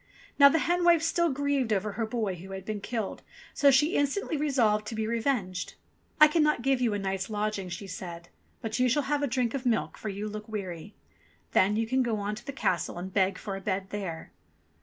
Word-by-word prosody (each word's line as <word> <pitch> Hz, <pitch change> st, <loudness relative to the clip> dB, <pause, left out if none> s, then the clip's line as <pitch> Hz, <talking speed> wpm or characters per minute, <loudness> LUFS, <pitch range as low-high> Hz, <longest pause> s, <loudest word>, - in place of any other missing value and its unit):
Now 280 Hz, 0 st, +10 dB
the 305 Hz, -, +2 dB
hen 350 Hz, +3 st, +1 dB
wife 340 Hz, -2 st, +5 dB
still 340 Hz, +1 st, +2 dB
grieved 280 Hz, -3 st, 0 dB
over 210 Hz, 0 st, 0 dB
her 220 Hz, +2 st, -2 dB
boy 220 Hz, -4 st, -1 dB
who 185 Hz, +2 st, -9 dB
had 190 Hz, -1 st, -7 dB
been 215 Hz, -1 st, -4 dB
killed, 225 Hz, -1 st, -4 dB, 0.3 s
so 285 Hz, -, +5 dB
she 295 Hz, +5 st, +4 dB
instantly 285 Hz, +4 st, 0 dB
resolved 240 Hz, -8 st, +1 dB
to 225 Hz, -, -4 dB
be 220 Hz, 0 st, -1 dB
revenged. 225 Hz, -5 st, -1 dB, 0.4 s
"I 305 Hz, -, +10 dB
cannot 300 Hz, -5 st, +2 dB
give 265 Hz, -1 st, +2 dB
you 230 Hz, -4 st, +2 dB
a -, -, 0 dB
night's 195 Hz, 0 st, -3 dB
lodging," 210 Hz, -3 st, -2 dB
she 180 Hz, +3 st, -6 dB
said. 170 Hz, -2 st, -8 dB, 0.3 s
"But 225 Hz, +1 st, -2 dB
you 250 Hz, 0 st, +4 dB
shall 290 Hz, +4 st, +2 dB
have 290 Hz, +1 st, 0 dB
a 285 Hz, -, +1 dB
drink 245 Hz, -2 st, 0 dB
of 275 Hz, -2 st, -3 dB
milk, 240 Hz, -3 st, 0 dB
for 215 Hz, -, -4 dB
you 200 Hz, +2 st, -4 dB
look 215 Hz, +1 st, -7 dB
weary. 195 Hz, -2 st, -6 dB, 0.6 s
Then 195 Hz, +3 st, +3 dB
you 225 Hz, +1 st, +1 dB
can 260 Hz, +3 st, +1 dB
go 235 Hz, -3 st, 0 dB
on 205 Hz, 0 st, -2 dB
to 215 Hz, +3 st, -8 dB
the -, -, -2 dB
castle 180 Hz, -, -1 dB
and 185 Hz, +2 st, -6 dB
beg 190 Hz, -1 st, +2 dB
for 200 Hz, -2 st, -5 dB
a 195 Hz, -, -6 dB
bed 190 Hz, 0 st, -2 dB
there." 185 Hz, -6 st, -5 dB
220 Hz, 225 wpm, -28 LUFS, 195-275 Hz, 0.6 s, Now